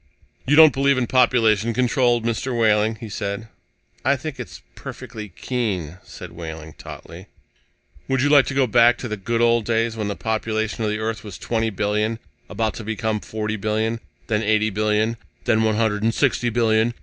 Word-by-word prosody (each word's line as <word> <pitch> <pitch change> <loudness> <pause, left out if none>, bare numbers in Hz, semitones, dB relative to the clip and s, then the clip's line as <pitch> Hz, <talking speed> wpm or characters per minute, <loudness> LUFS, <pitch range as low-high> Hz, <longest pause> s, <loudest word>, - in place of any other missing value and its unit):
"You 145 - +4
don't 155 -1 +8
believe 140 0 +2
in 130 - +1
population 115 -3 +3
control, 125 -1 +2
Mr. 115 +2 -2
Wehling?" 110 -1 +3
he 115 - -8
said. 100 +2 -4 0.5
"I - - +3
think - - -6
it's - - -8
perfectly 115 -5 -8
keen," 95 - -3
said - - -11
Wehling 80 -2 -8
tautly. 90 +4 -10 0.8
"Would 130 -1 +1
you 145 - +3
like 145 -2 +6
to 135 - -3
go 135 -1 +4
back 120 0 +5
to 125 - -5
the 105 - -3
good 115 +4 -2
old 120 -1 +3
days, 115 0 0
when 110 -2 -3
the 100 - -3
population 110 0 -2
of 110 - 0
the 105 - -1
Earth 110 +1 -3
was 105 -4 -8
twenty 115 -1 -1
billion 105 +2 -1 0.3
about 110 +1 -1
to - - -6
become 110 0 -2
forty 110 +1 -4
billion, 110 +2 -1 0.3
then 105 -2 0
eighty 110 0 +2
billion, 110 +2 0 0.3
then 110 -2 +3
one 110 -1 +2
hundred 110 -2 0
and 115 +1 +1
sixty 125 -3 +1
billion? 115 0 +2
110 Hz, 185 wpm, -22 LUFS, 105-120 Hz, 0.8 s, don't